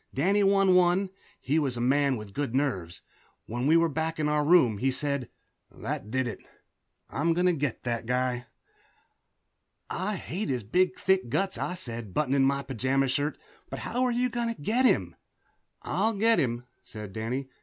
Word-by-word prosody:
Danny 195 +9 +3
won 195 -1 +4
one; 180 +1 +3 0.3
he 150 +5 +1
was 135 -5 -1
a - - -3
man 135 +2 +2
with 105 -2 -9
good 140 -2 -2
nerves. 95 - -1 0.4
When 120 +4 -2
we 160 +2 +6
were 165 0 +4
back 160 +1 -2
in 150 - +1
our 150 0 +2
room 145 - +4
he 135 - +2
said, 140 -1 -1 0.4
"That 105 - -5
did 130 +1 0
it 110 - -5 0.7
I'm 165 +4 +1
going 180 +2 +1
to 180 - +4
get 145 -6 -2
that 115 -2 -2
guy." 125 0 -1 1.4
"I 200 +3 -2
hate 185 +2 -4
his 125 -4 -1
big 180 - +1
thick 190 -8 +1
guts," 195 +9 -1
I 180 - -2
said, 115 - -7
buttoning 140 -2 +2
my 140 0 0
pajama 135 +1 0
shirt, 145 +4 -1 0.3
"but - - -5
how 250 - -1
are 250 - +2
you 250 +1 +1
going 235 -1 -1
to - - -8
get 230 - +1
him?" - - +2 0.7
"I'll 225 +1 0
get 225 +2 +3
him," 120 -2 -1 0.2
said 105 -3 -9
Danny. 125 +5 -3
145 Hz, 180 wpm, -28 LUFS, 125-180 Hz, 1.4 s, we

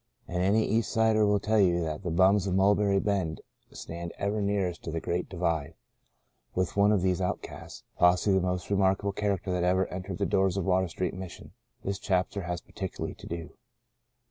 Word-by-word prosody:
And 90 0 -2
any 105 +4 +3
East 115 +2 0
Sider 110 -1 +3
will 105 0 +3
tell 110 +2 +1
you 90 -3 +4
that 80 -2 -3
the 90 - -3
"bums" 95 +4 +4
of 95 - 0
Mulberry 100 0 +3
Bend 95 -6 -1 0.3
stand 85 +1 -7
ever 105 +1 -1
nearest 100 -4 -1
to 80 - -4
the 80 - -2
Great 85 +2 -2
Divide. 85 -5 -1 0.8
With 90 -1 -1
one 100 +1 +4
of 100 -4 +2
these 95 -1 +1
outcasts 90 - -5
— - - -37
possibly 90 +2 +4
the 90 - -1
most 90 +1 -3
remarkable 100 0 +2
character 100 -2 -1
that 90 -1 0
ever 95 +1 +3
entered 90 0 -5
the 100 - 0
doors 95 -1 +1
of 95 - -1
Water 95 0 +2
Street 90 0 -3
Mission 95 -2 -9 0.2
— - - -40
this 100 +1 -2
chap 90 -2 0
ter 100 - -4
has 85 -1 -4
particularly 95 -3 -5
to - - -12
do. 85 -1 -6
95 Hz, 200 wpm, -28 LUFS, 90-100 Hz, 0.8 s, you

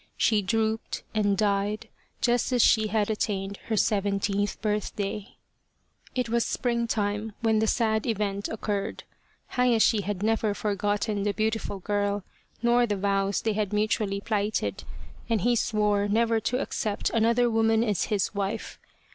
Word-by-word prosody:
She 215 -2 +3
drooped 220 +2 -1
and 205 -2 +2
died 205 +1 0 0.3
just 245 0 +2
as 245 -2 +4
she 220 -1 +4
had 215 0 0
attained 200 -2 -2
her 220 - 0
seventeenth 200 0 0
birthday. 210 -1 -3 0.8
It 250 -2 0
was 235 +1 +1
springtime 225 -3 -1
when 220 -2 +3
the 220 - +1
sad 220 -1 +1
event 205 -2 -1
occurred. 205 -1 -3 0.5
Hayashi 235 -4 +3
had 200 -1 -3
never 220 -1 +1
forgotten 205 0 -1
the 205 0 0
beautiful 220 -1 -1
girl 205 +1 -1 0.4
nor 240 0 +4
the 205 -2 -1
vows 195 0 0
they 220 - +1
had 210 -1 -1
mutually 210 -1 0
plighted, 210 0 -1 0.4
and 225 -4 +1
he 240 +5 +3
swore 210 -2 +1
never 225 +2 +2
to 250 +3 -1
accept 215 -6 -2
another 230 +2 +3
woman 225 0 +3
as 210 -5 0
his 205 -1 0
wife. 200 -1 -3
215 Hz, 140 wpm, -27 LUFS, 205-225 Hz, 0.8 s, as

